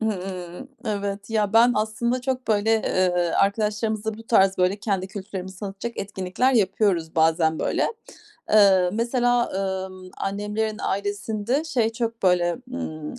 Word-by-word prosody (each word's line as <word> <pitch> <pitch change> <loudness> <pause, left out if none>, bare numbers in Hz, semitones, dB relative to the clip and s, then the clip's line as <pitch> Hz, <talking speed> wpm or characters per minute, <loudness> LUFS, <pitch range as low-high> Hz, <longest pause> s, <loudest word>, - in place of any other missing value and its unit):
Hımm. 185 0 -4 0.2
Evet. 200 -1 -3
Ya, 210 -2 +1
ben 235 +2 +6
aslında 225 +4 -1
çok, 255 -1 -3
böyle, 215 0 +2
eee, 185 -4 +2 0.3
arkadaşlarımızla 215 +1 0
bu - - -9
tarz, 195 -4 +3
böyle, 185 +2 +2
kendi 200 -3 -2
kültürlerimizi 190 -2 -7
tanıtacak 205 +4 -6
etkinlikler 195 +6 0
yapıyoruz 195 -6 +1
bazen, 160 0 +3
böyle. - - 0 0.6
Eee, 195 -4 +5
mesela, 240 +1 +1 0.4
ımm, 185 -1 -12
annemlerin 210 +2 -2
ailesinde 205 +6 -1
şey 240 -8 0
çok, 230 -1 -4
böyle, 175 -2 +3 0.2
ımm, 155 -13 -5
205 Hz, 125 wpm, -24 LUFS, 190-225 Hz, 0.6 s, ben